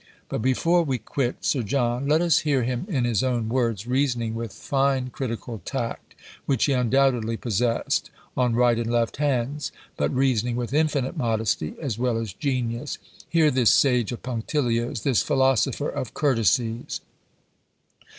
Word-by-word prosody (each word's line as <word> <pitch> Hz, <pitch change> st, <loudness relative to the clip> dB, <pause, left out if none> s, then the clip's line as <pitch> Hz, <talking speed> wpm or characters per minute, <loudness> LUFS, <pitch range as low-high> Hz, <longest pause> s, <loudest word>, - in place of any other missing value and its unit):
But -, -, -2 dB
before 165 Hz, +8 st, +3 dB
we 135 Hz, -6 st, -1 dB
quit 120 Hz, +3 st, -2 dB
Sir 135 Hz, -, +2 dB
John, 120 Hz, +3 st, 0 dB
let 155 Hz, +3 st, +3 dB
us 170 Hz, -3 st, +4 dB
hear 140 Hz, -5 st, +1 dB
him 125 Hz, +8 st, -2 dB
in 135 Hz, -9 st, 0 dB
his 115 Hz, -5 st, +1 dB
own 120 Hz, -4 st, 0 dB
words, 115 Hz, -4 st, 0 dB
reasoning 125 Hz, -3 st, 0 dB
with 115 Hz, -2 st, -4 dB
fine 135 Hz, 0 st, 0 dB
critical 115 Hz, -3 st, -5 dB
tact, 120 Hz, -4 st, -4 dB, 0.3 s
which 135 Hz, -5 st, +2 dB
he 140 Hz, -, +2 dB
undoubtedly 125 Hz, -2 st, +2 dB
possessed, 115 Hz, +1 st, 0 dB, 0.3 s
on 125 Hz, -2 st, +1 dB
right 120 Hz, -1 st, +3 dB
and 115 Hz, 0 st, -2 dB
left 120 Hz, -1 st, 0 dB
hands, 140 Hz, 0 st, -1 dB, 0.3 s
but -, -, +1 dB
reasoning 125 Hz, -3 st, +1 dB
with 120 Hz, +1 st, -3 dB
infinite 150 Hz, -4 st, +1 dB
modesty 110 Hz, -9 st, -1 dB
as 130 Hz, -8 st, -3 dB
well 125 Hz, -2 st, +1 dB
as 115 Hz, -5 st, -4 dB
genius. 125 Hz, +1 st, -2 dB, 0.3 s
Hear 160 Hz, -3 st, +4 dB
this 125 Hz, -3 st, +4 dB
sage 125 Hz, -6 st, +3 dB
of 120 Hz, -, -6 dB
punctilios, 120 Hz, -2 st, -1 dB
this 130 Hz, -5 st, +3 dB
philosopher 135 Hz, +1 st, +2 dB
of 125 Hz, -, -5 dB
courtesies. 115 Hz, -, +1 dB
125 Hz, 150 wpm, -25 LUFS, 115-135 Hz, 0.3 s, us